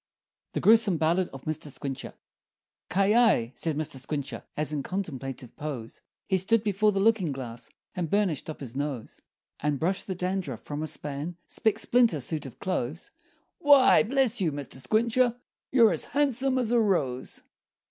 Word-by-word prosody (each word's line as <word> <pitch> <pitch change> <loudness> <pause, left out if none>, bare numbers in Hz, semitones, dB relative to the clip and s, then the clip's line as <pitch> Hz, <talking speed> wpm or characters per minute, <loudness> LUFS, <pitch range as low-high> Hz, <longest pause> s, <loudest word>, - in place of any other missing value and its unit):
The - - -1
Gruesome 220 -5 +5
Ballad 170 +4 +1
of 135 - -11
Mr. 155 -1 -3
Squincher 135 -1 -5 0.8
"Ki 195 +1 +2
yi!" 220 - +4
said 160 +4 -2
Mr. 155 -3 -2
Squincher, 140 +1 -4 0.2
As 150 0 -1
in 145 - -1
contemplative 135 - -5
pose, 135 -7 -6 0.3
He 190 - +2
stood 210 +4 +2
before 210 0 +2
the 195 - -1
looking 200 -6 +3
glass 120 -3 -6 0.2
And 175 -3 -3
burnished 190 -7 0
up 155 - -7
his 130 -3 -7
nose, 140 -5 -4 0.4
And 145 -1 -1
brushed 185 +4 -1
the 190 - -3
dandruff 180 - -3
from 145 0 -5
a 155 - -2
span 150 +4 -4
Spick 220 -1 0
splinter 230 -7 +3
suit 145 +2 -3
of 125 - -12
clothes, 165 -4 -3 0.5
"Why, 285 -5 +7
bless 245 -1 +1
you, 165 -4 +2
Mr. 140 -2 -5
Squincher, 235 - +2 0.4
You're 235 -4 +6
as - - 0
handsome 270 -2 +1
as 240 -3 0
a 240 - +4
rose!" 150 - -1
175 Hz, 165 wpm, -27 LUFS, 140-220 Hz, 0.8 s, Why